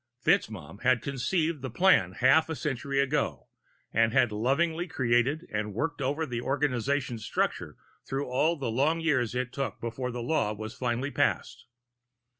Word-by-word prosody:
FitzMaugham 95 Hz, -3 st, 0 dB
had 130 Hz, -1 st, +3 dB
conceived 150 Hz, +3 st, -1 dB
the 130 Hz, -, -4 dB
plan 120 Hz, -, +4 dB
half 145 Hz, +10 st, +4 dB
a 160 Hz, -, -2 dB
century 140 Hz, -2 st, -2 dB
ago, 130 Hz, -, -1 dB, 0.4 s
and 115 Hz, +1 st, +3 dB
had 125 Hz, -4 st, +4 dB
lovingly 160 Hz, -, 0 dB
created 130 Hz, +4 st, +1 dB
and 105 Hz, -1 st, -2 dB
worked 145 Hz, +4 st, -2 dB
over 145 Hz, +4 st, 0 dB
the 120 Hz, -4 st, -4 dB
organization's 135 Hz, -3 st, -1 dB
structure -, -, -2 dB, 0.3 s
through 135 Hz, +1 st, -3 dB
all 150 Hz, +7 st, +1 dB
the 135 Hz, -7 st, -3 dB
long 145 Hz, +8 st, +2 dB
years 135 Hz, -8 st, +1 dB
it 125 Hz, 0 st, -2 dB
took 135 Hz, -1 st, -3 dB
before 120 Hz, +2 st, -4 dB
the 120 Hz, -1 st, -4 dB
law 120 Hz, -6 st, +1 dB
was 110 Hz, +1 st, -7 dB
finally 125 Hz, +2 st, -2 dB
passed. -, -, -1 dB
130 Hz, 155 wpm, -28 LUFS, 115-145 Hz, 0.4 s, plan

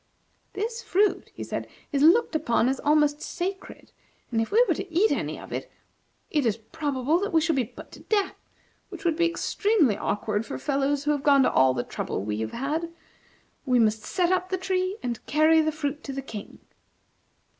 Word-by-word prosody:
"This 455 Hz, +3 st, -3 dB
fruit," 410 Hz, -1 st, +1 dB
he -, -, -5 dB
said, -, -, -4 dB, 0.2 s
"is 280 Hz, -, 0 dB
looked 340 Hz, +5 st, +5 dB
upon 235 Hz, -6 st, +2 dB
as 265 Hz, 0 st, 0 dB
almost 295 Hz, 0 st, +2 dB
sacred, 380 Hz, +2 st, -5 dB, 0.4 s
and 225 Hz, -1 st, +1 dB
if 225 Hz, -, -3 dB
we 470 Hz, +4 st, +5 dB
were -, -, +3 dB
to 375 Hz, -, -6 dB
eat 380 Hz, +7 st, +3 dB
any -, -, -2 dB
of -, -, -10 dB
it, -, -, -5 dB, 0.6 s
it 300 Hz, -2 st, +2 dB
is 225 Hz, -3 st, +1 dB
probable 285 Hz, +4 st, -1 dB
that 405 Hz, +2 st, -2 dB
we 325 Hz, -, +4 dB
should 320 Hz, 0 st, +1 dB
be 260 Hz, -3 st, +1 dB
put -, -, -13 dB
to -, -, -12 dB
death, 405 Hz, -3 st, 0 dB, 0.6 s
which 400 Hz, -, -10 dB
would 330 Hz, -2 st, +2 dB
be 340 Hz, +1 st, +3 dB
extremely 340 Hz, -, +1 dB
awkward 210 Hz, +1 st, -1 dB
for -, -, -6 dB
fellows 280 Hz, 0 st, 0 dB
who 295 Hz, -, +1 dB
have 290 Hz, -2 st, 0 dB
gone 280 Hz, -1 st, +5 dB
to -, -, +3 dB
all 130 Hz, 0 st, +4 dB
the 120 Hz, -, -1 dB
trouble -, -, -4 dB
we 105 Hz, +1 st, -3 dB
have 110 Hz, 0 st, -3 dB
had. 310 Hz, +6 st, -2 dB, 0.8 s
We 250 Hz, -1 st, +4 dB
must 220 Hz, -2 st, +3 dB
set 355 Hz, -, 0 dB
up 370 Hz, 0 st, 0 dB
the 375 Hz, -, 0 dB
tree 370 Hz, +1 st, -1 dB
and 240 Hz, -2 st, -3 dB
carry 315 Hz, +2 st, +5 dB
the 310 Hz, 0 st, +1 dB
fruit 300 Hz, -1 st, -4 dB
to 275 Hz, -, -5 dB
the 270 Hz, 0 st, -4 dB
King." 215 Hz, -5 st, -8 dB
300 Hz, 200 wpm, -26 LUFS, 250-360 Hz, 0.8 s, looked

